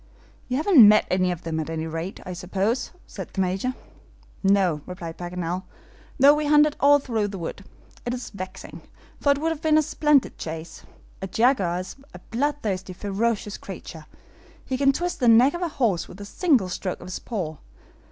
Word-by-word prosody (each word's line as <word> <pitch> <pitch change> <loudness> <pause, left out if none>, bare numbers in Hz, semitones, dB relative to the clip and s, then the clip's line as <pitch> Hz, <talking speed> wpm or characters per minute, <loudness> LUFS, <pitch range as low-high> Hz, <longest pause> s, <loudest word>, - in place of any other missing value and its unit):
"You 255 - -1
haven't 300 - +7
met 215 0 +5
any 185 0 +2
of 175 -1 -6
them, 160 -1 -2
at 155 - -3
any 160 0 -3
rate, 165 +4 -5
I 180 - -5
suppose?" 195 +7 -1 0.2
said - - -8
the - - -5
Major. 190 +8 -1 0.7
"No," 195 -6 +2
replied 170 -2 -7
Paganel, 175 0 -3 0.6
"though 280 +2 +8
we 300 0 -1
hunted 295 0 +5
all 285 +1 +6
through 230 -7 -1
the 200 -1 -6
wood. 175 +3 -6 0.4
It 240 - -3
is 250 - -7
vexing, 185 -2 -8 0.4
for 285 - +3
it 280 - +2
would 320 +3 0
have 320 -2 -5
been 310 -1 +4
a 310 - +4
splendid 295 -2 +2
chase. 160 0 -7 0.4
A 195 - -3
jaguar 195 -5 +2
is 185 - -9 0.2
a - - -9
bloodthirsty, 225 -8 -2
ferocious 205 +2 -2
creature. 165 -5 -9 0.6
He 260 - -2
can 275 +1 +4
twist 350 +5 -3
the 245 - +2
neck 235 +5 +6
of 345 - -5
a 350 - 0
horse 230 - 0
with 180 - -12
a 205 - -7
single 255 - +2
stroke 185 +1 -4
of - - -9
his 185 - -5
paw. 175 -10 -4
205 Hz, 190 wpm, -24 LUFS, 180-275 Hz, 0.7 s, though